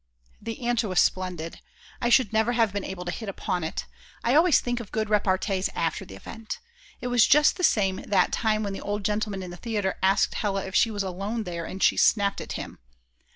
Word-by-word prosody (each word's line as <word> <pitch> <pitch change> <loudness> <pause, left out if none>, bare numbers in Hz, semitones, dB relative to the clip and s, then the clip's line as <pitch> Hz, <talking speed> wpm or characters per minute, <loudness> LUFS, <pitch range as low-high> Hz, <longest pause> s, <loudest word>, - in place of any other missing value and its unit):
The 225 +3 -6
answer 240 -2 +1
was 185 - +2
splendid; 180 -3 -1 0.4
I 240 - +1
should 245 -4 +4
never 220 +2 +2
have 225 -4 +2
been 200 -1 -2
able 180 -2 -6
to 175 - -2
hit 215 +3 -5
upon 180 -2 -3
it; 160 - -4 0.4
I 240 - +2
always 320 0 +5
think 245 0 -2
of 225 -5 -9
good 215 -1 -2
repartees 195 -1 +1
after 165 -1 -1
the 95 - -11
event. 220 - -7 0.4
It 250 - -3
was 245 -3 +5
just 300 +1 +5
the 365 - -5
same 195 - +3
that 190 -3 +1
time 215 -1 +1
when 200 -1 -3
the - - -6
old 205 -1 -3
gentleman 210 -2 -1
in 180 - -7
the 175 - -9
theatre 210 -3 -2
asked 195 +2 +3
Hella 195 -2 -1
if 190 - -7
she 225 - +4
was 205 -2 -2
alone 195 +5 -3
there, 170 -3 -5
and 190 +3 -4
she - - +4
snapped 200 -2 +3
at - - -6
him. - - -7
205 Hz, 220 wpm, -26 LUFS, 190-225 Hz, 0.4 s, always